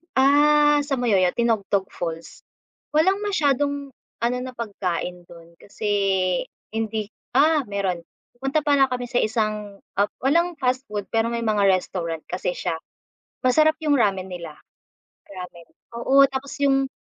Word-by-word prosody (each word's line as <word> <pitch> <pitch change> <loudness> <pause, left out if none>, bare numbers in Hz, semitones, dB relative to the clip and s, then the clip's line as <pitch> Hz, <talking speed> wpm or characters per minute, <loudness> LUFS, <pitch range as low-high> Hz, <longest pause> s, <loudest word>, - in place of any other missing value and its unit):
Ah, 295 +2 +5
sa 285 -2 0
Moyoyao 200 -8 +2
Tinogtog 205 -4 0
Falls, 165 -1 -6 0.5
walang 375 +6 +4
masyadong 285 -8 0 0.3
ano 240 +1 +1
na 255 0 -6
pagkain 180 -5 -4
do'n, 170 0 -15
kasi 205 +2 -9 0.9
hindi 220 -1 -2 0.3
ah, 300 +1 +4
meron, 195 -3 -1 0.4
pumunta 270 +4 0
pala 285 -2 +4
kami 250 -1 -3
sa 245 - +1
isang, 215 -2 -2 0.2
ah, 200 - +4 0.2
walang 340 +6 +2
fast 260 0 0
food 205 -1 -4
pero 225 0 +2
may 235 0 -2
mga 210 -3 +2
restaurant 175 -3 -1
kasi 180 0 -2
siya. 165 - -2 0.6
Masarap 310 +5 +4
yung 300 -2 +2
ramen 195 -5 +1
nila, 170 -4 -7 0.7
ramen, 180 -3 -10 0.3
oo 275 +3 +5
tapos 270 +1 -5
yung 270 -1 +3
235 Hz, 135 wpm, -23 LUFS, 195-280 Hz, 0.9 s, Ah